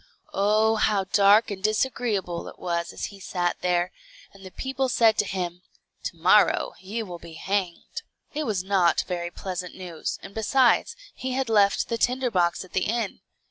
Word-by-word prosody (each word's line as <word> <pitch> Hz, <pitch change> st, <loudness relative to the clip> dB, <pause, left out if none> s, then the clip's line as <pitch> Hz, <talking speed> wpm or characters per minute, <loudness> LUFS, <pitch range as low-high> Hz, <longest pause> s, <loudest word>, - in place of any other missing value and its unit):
Oh, 215 Hz, +2 st, +3 dB
how 210 Hz, -2 st, +2 dB
dark 205 Hz, +3 st, +4 dB
and 190 Hz, -2 st, -5 dB
disagreeable 215 Hz, -5 st, -1 dB
it -, -, -10 dB
was 170 Hz, -1 st, -2 dB
as -, -, -4 dB
he 200 Hz, -, -13 dB
sat 175 Hz, -2 st, -1 dB
there, 180 Hz, 0 st, +1 dB, 0.4 s
and 195 Hz, -1 st, -16 dB
the 190 Hz, -, -8 dB
people 265 Hz, +5 st, -2 dB
said 225 Hz, -2 st, +4 dB
to -, -, +3 dB
him, 180 Hz, -2 st, -4 dB, 0.4 s
"To -, -, -4 dB
morrow -, -, +4 dB
you 215 Hz, +4 st, -4 dB
will 175 Hz, -3 st, -8 dB
be 170 Hz, -1 st, -11 dB
hanged." 185 Hz, +1 st, -3 dB, 0.3 s
It 305 Hz, 0 st, -2 dB
was 200 Hz, -5 st, -1 dB
not 185 Hz, -4 st, +3 dB
very 175 Hz, -1 st, -3 dB
pleasant 180 Hz, 0 st, -6 dB
news, 175 Hz, -4 st, -5 dB
and 195 Hz, -, -10 dB
besides, 240 Hz, +3 st, +3 dB, 0.2 s
he 260 Hz, 0 st, -4 dB
had 265 Hz, -2 st, -1 dB
left 205 Hz, -2 st, +3 dB
the 230 Hz, -, -2 dB
tinder 250 Hz, +1 st, +1 dB
box 175 Hz, -2 st, +1 dB
at 185 Hz, -, -20 dB
the 185 Hz, -, +1 dB
inn. 230 Hz, -2 st, -2 dB
195 Hz, 180 wpm, -25 LUFS, 180-220 Hz, 0.4 s, dark